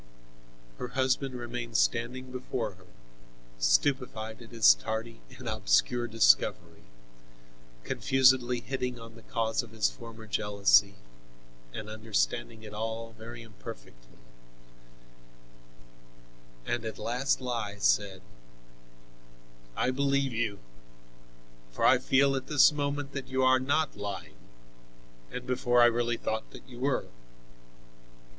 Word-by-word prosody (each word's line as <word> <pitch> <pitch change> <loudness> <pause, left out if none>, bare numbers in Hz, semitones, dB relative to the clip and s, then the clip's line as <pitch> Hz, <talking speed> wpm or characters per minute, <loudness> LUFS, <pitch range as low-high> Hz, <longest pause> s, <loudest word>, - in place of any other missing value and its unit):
Her - - -3
husband 130 0 +1
remained 120 -1 -4
standing 125 +2 0
before 125 -3 -3
her, 95 0 -20 0.7
stupefied 110 - +1
at 115 - -12
his 115 - +6
tardy 110 - -5 0.2
and - - -9
obscure 120 - +1
discovery, 110 - +2 1.0
confusedly 130 - +3
hitting 125 -1 -3
on 115 0 -11
the 115 - -14
cause 115 0 -1
of 120 - -12
his 110 -1 0
former 115 -2 -11
jealousy 100 - +3 0.8
and 105 - -7
understanding 110 +1 -2
it 105 -1 -9
all 115 +1 -4
very 115 +2 -10
imperfectly, - - -12 2.5
and 120 -1 -2
at 110 -1 -5
last 125 +4 0
he 115 -5 -3
said: 95 +11 +1 1.5
"I 130 - +1
believe 140 0 +1
you, 110 -3 -1 1.1
for - - -1
I - - +6
feel 135 +1 +3
at 130 0 -4
this 150 0 +6
moment 145 -1 -2
that 140 -1 -5
you 130 0 0
are 130 0 +5
not 145 +4 0
lying, 100 -1 -6 0.9
and 125 - -6
before 125 -1 +2
I - - +9
really 120 0 +1
thought 110 0 -3
that - - -12
you 120 -2 -11
were." 135 +1 0
120 Hz, 115 wpm, -29 LUFS, 110-130 Hz, 2.5 s, I